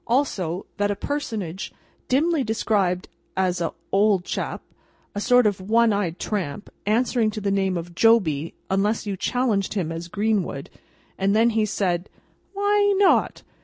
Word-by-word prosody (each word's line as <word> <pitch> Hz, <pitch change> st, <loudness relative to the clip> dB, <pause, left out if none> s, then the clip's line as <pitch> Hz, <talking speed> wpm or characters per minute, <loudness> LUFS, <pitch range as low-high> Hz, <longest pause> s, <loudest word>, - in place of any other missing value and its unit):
Also, 195 Hz, -, 0 dB
that 205 Hz, 0 st, +1 dB
a 205 Hz, -, 0 dB
personage, 210 Hz, -, -4 dB, 0.4 s
dimly 305 Hz, +3 st, +2 dB
described 200 Hz, -5 st, 0 dB, 0.3 s
as 180 Hz, -2 st, +1 dB
"a 170 Hz, -, -1 dB, 0.2 s
hold 200 Hz, -2 st, +3 dB
chap, -, -, -4 dB, 0.5 s
a 205 Hz, -, -3 dB
sort 245 Hz, +2 st, +4 dB
of 200 Hz, -3 st, +1 dB
one 225 Hz, +3 st, +3 dB
eyed 185 Hz, -4 st, -1 dB
tramp, 200 Hz, -3 st, -4 dB, 0.2 s
answering 230 Hz, +1 st, +2 dB
to 215 Hz, -, -5 dB
the 200 Hz, -1 st, -1 dB
name 190 Hz, -2 st, +1 dB
of 170 Hz, +1 st, -6 dB
Joby, 170 Hz, -8 st, +3 dB, 0.2 s
unless 205 Hz, +4 st, +1 dB
you 200 Hz, -2 st, -2 dB
challenged 215 Hz, -2 st, 0 dB
him 175 Hz, -5 st, -1 dB
as 165 Hz, +1 st, -5 dB
Greenwood, 200 Hz, -7 st, -1 dB, 0.5 s
and 195 Hz, +1 st, +2 dB
then 230 Hz, +2 st, +4 dB
he 220 Hz, -1 st, +1 dB
said, 180 Hz, -3 st, -1 dB, 0.5 s
'Why 405 Hz, 0 st, +3 dB
not? 395 Hz, -1 st, +3 dB
205 Hz, 150 wpm, -24 LUFS, 185-230 Hz, 0.5 s, sort